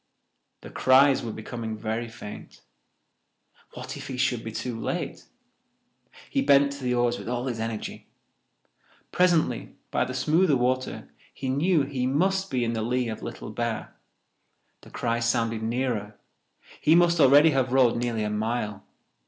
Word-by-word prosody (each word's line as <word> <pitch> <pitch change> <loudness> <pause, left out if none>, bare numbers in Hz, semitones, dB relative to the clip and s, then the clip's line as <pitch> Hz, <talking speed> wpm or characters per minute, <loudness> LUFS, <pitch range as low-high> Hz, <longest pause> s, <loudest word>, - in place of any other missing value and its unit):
The - - -11
cries 135 +1 +5
were 115 - -4
becoming 110 0 -6
very 110 +2 -3
faint. 110 -2 -10 1.1
What - - -7
if - - -8
he 130 - -5
should 125 -3 0
be 110 - -5
too 115 +1 -4
late? - - -4 1.0
He - - 0
bent 140 0 +4
to 140 -1 -8
the 125 -1 0
oars 120 0 +1
with - - -7
all 125 0 -2
his 120 -4 -3
energy. 110 -1 -5 1.0
Presently, 175 -3 +1 0.2
by - - +1
the 130 - -6
smoother 155 +3 +3
water, 130 +1 -2 0.2
he 135 - -5
knew 150 +4 +2
he 135 -2 -2
must 190 +8 +1
be 125 -3 0
in 115 0 -1
the 110 - -2
lea 120 +1 0
of 110 - -6
Little - - -7
Bear. 115 +1 -4 0.9
The - - -15
cries 115 -1 -1
sounded 115 -1 0
nearer. 115 -3 -2 0.6
He 155 - +5
must 170 -1 +4
already 145 +3 +7
have 130 -3 0
rowed 130 -3 +4
nearly 120 -2 -1
a 105 - -2
mile. 105 -1 -2
125 Hz, 155 wpm, -26 LUFS, 115-140 Hz, 1.1 s, already